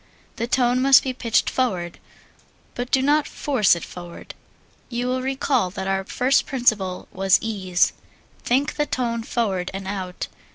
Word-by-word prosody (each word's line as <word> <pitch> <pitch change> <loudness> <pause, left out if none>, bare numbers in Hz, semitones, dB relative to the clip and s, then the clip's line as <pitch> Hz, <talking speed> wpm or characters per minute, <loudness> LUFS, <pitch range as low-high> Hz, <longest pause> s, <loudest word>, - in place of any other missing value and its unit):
The 235 - -2
tone 250 0 +2
must 270 0 +7
be 260 - -2
pitched 235 -3 +1
forward, 185 -10 -1 0.7
but 245 0 -4
do 265 0 +2
not 295 +2 +3
force 250 -11 +2
it 170 - -6
forward. 175 -1 -10 0.6
You 245 0 -2
will 255 +1 -1
recall 260 -5 0
that 190 +1 -5
our 195 0 0
first 260 +6 +1
principle 215 -8 0
was 190 0 +3
ease. 190 -5 0 0.5
Think 270 +5 0
the 295 -1 0
tone 235 -2 -1
forward 200 -6 -1
and 195 0 -6
out. 190 -2 -4
235 Hz, 155 wpm, -23 LUFS, 190-255 Hz, 0.7 s, must